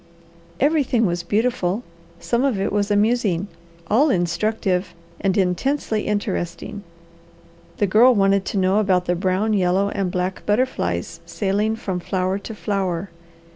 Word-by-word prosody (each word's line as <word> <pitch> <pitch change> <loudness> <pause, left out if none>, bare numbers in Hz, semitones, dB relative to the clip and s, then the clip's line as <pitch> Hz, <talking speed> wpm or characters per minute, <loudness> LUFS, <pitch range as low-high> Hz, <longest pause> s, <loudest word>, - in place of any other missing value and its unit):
Everything 280 -6 +2
was 175 -2 -1
beautiful, 210 +1 0 0.4
some 235 +6 0
of 260 -8 +1
it 195 +1 -1
was 205 0 +1
amusing, 205 -3 +1 0.4
all 270 - +3
instructive, 185 0 0 0.2
and 195 0 0
intensely 215 +5 0
interesting. 205 -2 -3 1.0
The 205 - +2
Girl 230 +6 +5
wanted 195 -1 +3
to - - -3
know 190 +2 +3
about 185 -4 +2
the 175 - +1
brown, 190 +4 0
yellow, 190 0 +2
and 195 -2 -2
black 180 +1 -3
butterflies 255 +5 -1
sailing 210 +2 0
from 190 -5 -4
flower 185 +2 -1
to 220 +2 -8
flower. 195 -3 -2
200 Hz, 135 wpm, -22 LUFS, 185-220 Hz, 1.0 s, Girl